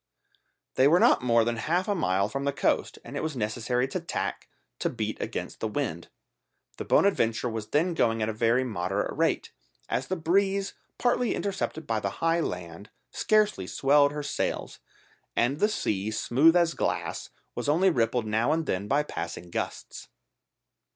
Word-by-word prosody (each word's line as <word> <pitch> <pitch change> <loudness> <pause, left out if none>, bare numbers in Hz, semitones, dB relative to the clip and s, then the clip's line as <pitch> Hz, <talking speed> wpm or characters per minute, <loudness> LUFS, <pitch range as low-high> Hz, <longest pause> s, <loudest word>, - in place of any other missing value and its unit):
They 130 - +6
were 170 +5 +5
not - - +5
more 115 -2 +3
than 120 0 -1
half 175 +10 0
a 205 - +2
mile 100 - +1
from 135 +6 -4
the 140 - +1
coast, - - 0
and 120 - -8
it - - -2
was 155 -2 -3
necessary 120 +3 -1
to 185 - -2
tack 170 - -4 0.3
to - - 0
beat - - -4
against - - -5
the - - -1
wind. - - -3 0.7
The - - -5
Bonadventure 120 - +2
was 110 -2 -4
then 165 +4 +1
going 115 -8 +1
at - - 0
a 110 - -2
very 115 +3 +2
moderate 100 -4 -2
rate, - - 0 0.4
as - - -1
the 185 - -1
breeze, 195 +4 +1 0.2
partly 245 -1 +1
intercepted 185 -5 -3
by 115 -4 0
the 100 -2 -3
high 165 +1 +2
land, 90 - -5 0.2
scarcely 210 - +1
swelled 145 +4 +3
her 150 0 -4
sails, 145 - -3 0.6
and 130 +5 +1
the 210 - +3
sea, 105 - -1
smooth 135 +9 +3
as 170 -2 +3
glass, - - -2 0.2
was - - -3
only 180 +6 +4
rippled 115 -4 +1
now 110 +2 +1
and 160 +1 0
then 95 -3 -2
by 145 +5 +2
passing 85 - -6
gusts. - - -5
135 Hz, 170 wpm, -27 LUFS, 110-165 Hz, 0.7 s, They